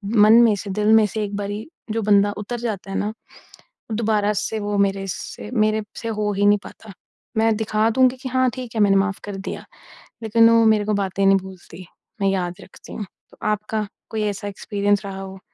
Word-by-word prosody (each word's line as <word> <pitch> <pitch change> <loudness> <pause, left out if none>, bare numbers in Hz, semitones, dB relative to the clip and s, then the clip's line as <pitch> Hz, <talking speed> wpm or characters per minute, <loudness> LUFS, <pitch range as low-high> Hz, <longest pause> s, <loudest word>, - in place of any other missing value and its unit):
मन 215 +1 +7
में 220 -3 +4
से, 200 +1 -7
दिल 210 +2 +2
में 220 -1 +6
से 215 +2 -3
एक 205 0 -4
बारी 205 +3 -4 0.2
जो 225 0 -1
बंदा 205 0 +4
उतर 230 +3 -5
जाता 210 -4 -4
है - - -2
ना, 210 +1 -2 0.8
दोबारा 210 -2 +1
से 210 +1 -2
वो 205 0 -2
मेरे 195 -1 +1
से 210 - -7
मेरे 215 -2 +2 0.2
से 230 - -5
हो 210 -1 -1
ही 200 +1 +1
नहीं 205 0 +5
पाता। 215 - -12 0.5
मैं 225 0 +3
दिखा 220 0 +1
दूँगी 255 +1 +3
कि 260 - -4
हाँ, 255 0 +2
ठीक 245 -3 -7
है, 215 - +1
मैंने 200 -1 +4
माफ़ 195 0 0
कर 205 -1 -6
दिया। 195 - -6 0.6
लेकिन 230 +1 +5
वो 230 -1 +5
मेरे 215 -2 +3
को 215 - 0
बातें 195 0 -1
नहीं 195 0 +6
भूलती, 185 -1 -10 0.4
मैं 195 - +2
याद 180 -2 -1
रखती - - -13
हूँ, 210 - -5 0.3
तो - - -19
आपका 210 0 -1 0.2
कोई 220 -1 -1
ऐसा 205 0 -3
एक्सपीरियंस 205 0 -1
रहा 195 -1 -6
हो? 190 0 -8
210 Hz, 210 wpm, -22 LUFS, 200-220 Hz, 0.8 s, मन